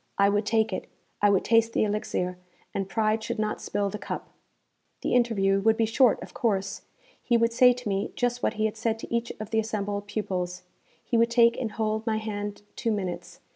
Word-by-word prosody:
I 200 Hz, 0 st, +5 dB
would 205 Hz, +1 st, 0 dB
take 220 Hz, 0 st, +2 dB
it -, -, -4 dB, 0.3 s
I 205 Hz, -, +5 dB
would 195 Hz, -2 st, +2 dB
taste 230 Hz, 0 st, +3 dB
the -, -, +2 dB
elixir, 180 Hz, -4 st, -2 dB, 0.3 s
and 195 Hz, -1 st, -2 dB
pride 215 Hz, +1 st, +1 dB
should -, -, -3 dB
not 215 Hz, 0 st, -2 dB
spill 200 Hz, -1 st, -1 dB
the 210 Hz, -, -5 dB
cup. -, -, -5 dB, 0.7 s
The -, -, 0 dB
interview 205 Hz, -5 st, +3 dB
would 220 Hz, +2 st, +3 dB
be 225 Hz, -, +3 dB
short, 235 Hz, +2 st, +4 dB
of -, -, -11 dB
course. 195 Hz, -4 st, -1 dB, 0.4 s
He 240 Hz, -, +2 dB
would 230 Hz, 0 st, +2 dB
say 250 Hz, +1 st, +7 dB
to 250 Hz, -2 st, -7 dB
me 195 Hz, 0 st, -1 dB
just 245 Hz, 0 st, 0 dB
what -, -, +1 dB
he 215 Hz, 0 st, 0 dB
had 220 Hz, -, -1 dB
said 225 Hz, 0 st, 0 dB
to 225 Hz, -, -8 dB
each 235 Hz, 0 st, -1 dB
of 215 Hz, 0 st, -6 dB
the 220 Hz, -, +2 dB
assembled 205 Hz, -2 st, -2 dB
pupils. 185 Hz, -4 st, -3 dB, 0.4 s
He 235 Hz, -, 0 dB
would 230 Hz, 0 st, +4 dB
take 235 Hz, -1 st, +5 dB
and 225 Hz, -4 st, -3 dB
hold 220 Hz, 0 st, -1 dB
my 220 Hz, -1 st, +1 dB
hand 205 Hz, -1 st, -4 dB
two 230 Hz, -, -1 dB
minutes. 190 Hz, -4 st, -4 dB
215 Hz, 210 wpm, -27 LUFS, 200-230 Hz, 0.7 s, say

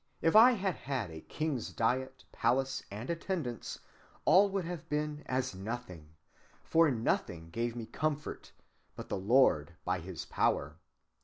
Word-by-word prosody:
If 165 Hz, -, +2 dB
I 240 Hz, +4 st, +9 dB
had 195 Hz, -4 st, 0 dB
had 125 Hz, -8 st, -3 dB
a 80 Hz, 0 st, -8 dB
king's 150 Hz, -, -3 dB
diet, 130 Hz, +3 st, -1 dB
palace, 135 Hz, +1 st, +1 dB
and 105 Hz, +5 st, -6 dB
attendance, 165 Hz, -, -3 dB, 0.5 s
all 200 Hz, +2 st, +6 dB
would 195 Hz, -2 st, -2 dB
have 170 Hz, -3 st, -6 dB
been 150 Hz, 0 st, -2 dB
as 130 Hz, -2 st, -1 dB
nothing; 95 Hz, -6 st, -7 dB, 0.5 s
for 165 Hz, -1 st, +4 dB
nothing 85 Hz, -9 st, -1 dB
gave 115 Hz, +4 st, -2 dB
me 115 Hz, -2 st, -5 dB
comfort 150 Hz, +4 st, -3 dB, 0.4 s
but -, -, -8 dB
the -, -, -2 dB
Lord 95 Hz, -, +3 dB
by 90 Hz, 0 st, 0 dB
his 85 Hz, 0 st, -7 dB
power. -, -, 0 dB
130 Hz, 145 wpm, -32 LUFS, 100-155 Hz, 0.5 s, I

